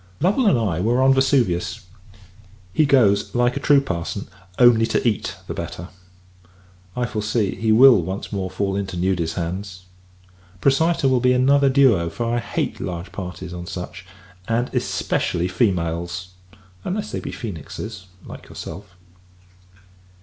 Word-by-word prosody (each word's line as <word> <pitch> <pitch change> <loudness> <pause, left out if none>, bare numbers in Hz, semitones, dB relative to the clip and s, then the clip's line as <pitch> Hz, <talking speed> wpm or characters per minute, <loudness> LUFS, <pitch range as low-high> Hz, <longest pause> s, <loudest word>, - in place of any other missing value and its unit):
Lovel 210 +7 +2
and 170 - +4
I 100 -8 -1
were 115 +6 +1
on 135 +1 +5
Vesuvius. 125 -10 +1 0.9
He 150 +8 +3
goes, 105 -7 +3
like 120 0 +2
a - - -2
true 145 -2 +4
parson, 95 -3 -4 0.3
only 115 -2 +5
to - - 0
eat 110 - -1
the - - -5
better. 85 +2 -6 1.1
I 125 - 0
foresee, 105 -2 -1
he 110 0 0
will 120 -2 +7
once 95 +4 -5
more 95 -2 -2
fall 100 +1 -2
into 95 -2 -3
Nudi's 85 -3 0
hands. 90 +1 -5 0.8
Procyta 140 - +2
will 130 -1 +3
be 125 +1 +3
another 135 +2 +4
Duo; 130 -11 +4
for 120 - -4
I 120 - +1
hate 120 - -3
large 85 0 -5
parties 90 -1 -7
on 90 0 -7
such, 90 -2 -7 0.4
and 115 +2 -1
especially 85 +1 -1
females 85 -3 -1 0.5
unless 210 +3 -3
they - - -3
be - - -6
Phoenixes, 100 - -7 0.2
like - - -11
yourself. 100 -1 -9
105 Hz, 140 wpm, -22 LUFS, 90-125 Hz, 1.1 s, will